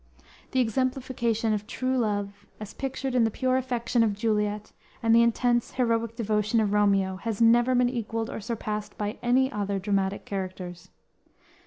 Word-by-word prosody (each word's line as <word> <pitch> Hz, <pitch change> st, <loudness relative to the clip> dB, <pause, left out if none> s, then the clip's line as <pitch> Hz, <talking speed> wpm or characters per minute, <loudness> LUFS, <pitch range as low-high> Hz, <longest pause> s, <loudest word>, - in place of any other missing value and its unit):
The 260 Hz, -, 0 dB
exemplification 240 Hz, -2 st, 0 dB
of 210 Hz, 0 st, -3 dB
true 255 Hz, +2 st, -1 dB
love, 205 Hz, -3 st, -2 dB
as 210 Hz, -1 st, -8 dB
pictured 270 Hz, -1 st, -3 dB
in 250 Hz, -2 st, +4 dB
the 225 Hz, -, +3 dB
pure 255 Hz, +3 st, 0 dB
affection 245 Hz, -2 st, 0 dB
of 215 Hz, -3 st, +2 dB
Juliet 210 Hz, -1 st, -1 dB, 0.3 s
and 225 Hz, 0 st, +4 dB
the 230 Hz, -, +7 dB
intense, 240 Hz, +1 st, +1 dB
heroic 230 Hz, -2 st, 0 dB
devotion 215 Hz, 0 st, +1 dB
of 210 Hz, -2 st, +1 dB
Romeo, 195 Hz, -2 st, +2 dB
have 220 Hz, +1 st, -4 dB
never 240 Hz, +2 st, +5 dB
been 245 Hz, 0 st, +4 dB
equaled 230 Hz, -2 st, -3 dB
or -, -, -5 dB
surpassed 215 Hz, -1 st, -4 dB
by 210 Hz, +2 st, -3 dB
any 260 Hz, +2 st, +2 dB
other 200 Hz, -1 st, -2 dB
dramatic 195 Hz, 0 st, -1 dB
characters. 185 Hz, -2 st, -6 dB
225 Hz, 160 wpm, -27 LUFS, 205-245 Hz, 0.3 s, the